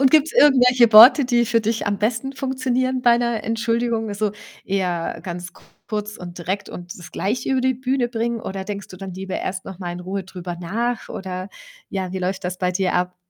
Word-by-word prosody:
Und 270 -1 +5
gibt‘s 310 +1 +4
irgendwelche 250 -4 +5
Worte, 245 +6 +10
die 240 -1 +2
für 230 0 +2
dich 220 +1 -1
am 205 -1 0
besten 230 +5 -1
funktionieren 260 -1 -1
bei 240 -1 +5
‘ner 235 -2 -1
Entschuldigung? 230 0 0
Also, 205 0 -1 0.3
eher 180 -4 -2
ganz 175 0 -6 0.3
kurz 210 -1 -4
und 175 -1 -9
direkt 190 +4 -3
und 175 0 -9
das 175 0 -11
gleich 230 +5 -2
über 265 -1 +1
die 260 0 +3
Bühne 255 0 0
bringen 235 0 -2
oder 190 0 -4
denkst 200 -1 -6
du 185 - -11
dann 190 -1 -7
lieber 190 0 -4
erst 190 0 -4
noch 190 -2 -9
mal 180 -2 -4
in 175 - -7
Ruhe 190 +2 -4
drüber 180 -1 -7
nach 230 +7 -2
oder 185 0 -5 0.4
ja, 185 -2 -3
wie 190 - -3
läuft 190 +1 -3
das 180 0 -3
bei 180 -1 +1
dir 185 0 0
ab? 180 0 0
210 Hz, 210 wpm, -22 LUFS, 185-240 Hz, 0.4 s, Worte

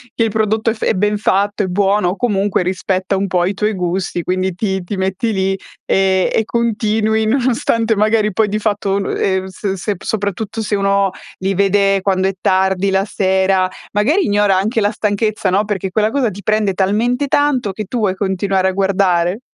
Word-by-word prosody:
Che 230 - +1
il 225 - +1
prodotto 220 +1 0
è - - -2
f 220 - -8
è - - +2
ben 210 +2 +1
fatto, 205 0 +1
è 195 - 0
buono 195 +1 +1
o 180 - -2
comunque 205 -5 0
rispetta 185 +1 -1
un 195 +1 -1
po' 180 -2 +1
i 190 - -1
tuoi 210 +2 -1
gusti. 180 -1 -2
Quindi, 185 0 -1
ti 190 -2 -2
ti 190 +4 -5
metti 190 +5 -1
lì, 195 -1 0 0.3
ehm, 190 -1 +2
e 220 - +1
continui 220 -1 0
nonostante 230 -2 +1
magari 215 0 +2
poi 220 +2 +2
di 210 +1 -2
fatto 205 -2 -1
un 200 -1 -1
ehm, 190 -1 0
se 190 +1 -4
se 205 +3 -2
soprattutto 205 +1 -3
se 210 - -1
uno 195 -1 +1 0.3
li 190 +1 -1
vede 195 0 +2
quando 190 -1 +1
è 195 - -1
tardi 190 +1 +2
la 190 +1 +1
sera, 190 -1 +1 0.2
magari 275 - +2
ignora 205 -2 +2
anche 215 +4 0
la 205 - +2
stanchezza, 210 -2 -1
no, 200 +3 +2
perché 195 -2 -3
quella 215 +2 +1
cosa 250 -3 0
ti 200 - -9
prende 215 0 +1
talmente 225 +9 0
tanto 270 -6 +1
che 215 +3 -5
tu 235 +5 -3
vuoi 195 -3 0
continuare 190 -1 0
a - - -1
guardare. 190 -1 +1
200 Hz, 195 wpm, -17 LUFS, 190-215 Hz, 0.3 s, è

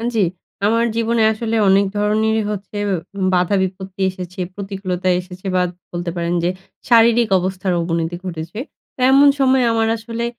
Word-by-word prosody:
জি, - - +2 0.5
আমার 230 +2 +3
জীবনে 230 0 +1
আসলে 225 +1 -2
অনেক 195 +1 +4
ধরনেরই 215 +1 +1
হচ্ছে 205 0 -6 0.6
বাধা-বিপত্তি 190 +1 -1
এসেছে, 185 0 -8 0.2
প্রতিকূলতা 190 -2 -4
এসেছে, 180 +1 -11
বা 180 - +3 0.3
বলতে 175 0 -3
পারেন 170 0 -1
যে, 175 - +2 0.4
শারীরিক 235 0 +5
অবস্থার 185 0 -2
অবনতি 165 0 -2
ঘটেছে। 170 +3 -6 0.5
এমন 275 +2 +6
সময় 265 -1 +4
আমার 225 -1 +1
আসলে 230 +1 -4
195 Hz, 135 wpm, -19 LUFS, 180-225 Hz, 0.6 s, এমন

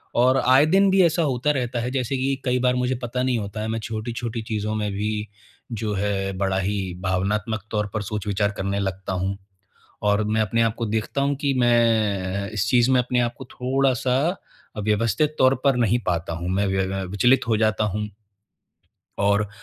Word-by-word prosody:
और 130 +2 +4
आए 130 +4 +6
दिन 195 +4 +4
भी 190 0 +5
ऐसा 165 +1 +2
होता 140 0 +1
रहता 125 -3 -2
है 125 +2 -3
जैसे 135 0 -1
कि 135 +1 0
कई 125 0 +1
बार 125 0 +2
मुझे 125 +1 0
पता 125 +1 -2
नहीं 130 -2 +1
होता 105 +1 -5
है 110 - -3
मैं 115 0 -2
छोटी-छोटी 115 +1 -4
चीज़ों 110 -1 -3
में 105 -1 -2
भी 105 +1 -2 0.4
जो 110 -2 -2
है, 95 0 -1
बड़ा 95 -1 0
ही 95 -1 -2
भावनात्मक 100 +3 -1
तौर 105 -1 0
पर 110 - -1
सोच-विचार 105 0 -1
करने 100 +1 -1
लगता 95 -1 -3
हूँ, 95 +2 -2 0.7
और 105 +1 +2
मैं 110 +1 +1
अपने 110 +2 +1
आपको 115 +1 -1
देखता 110 +6 -1
हूँ 140 0 +1
कि 140 -2 +1
मैं 105 -5 +2
इस 100 -1 0
चीज़ 125 0 +4
में 130 - +4
अपने 125 0 -1
आपको 120 +2 -3
थोड़ा-सा 130 0 +1 0.7
व्यवस्थित 115 +8 +1
तौर 130 +1 +5
पर 135 -2 +4
नहीं 120 0 +2
पाता 85 -1 -1
हूँ, 85 +2 -4
मैं 100 +2 +1
व्य 95 0 0
व 95 0 -3
विचलित 120 +4 +3
हो 110 -2 +2
जाता 110 -1 +1
हूँ। 105 +1 -3 1.1
और 100 0 +2
110 Hz, 185 wpm, -23 LUFS, 100-125 Hz, 1.1 s, आए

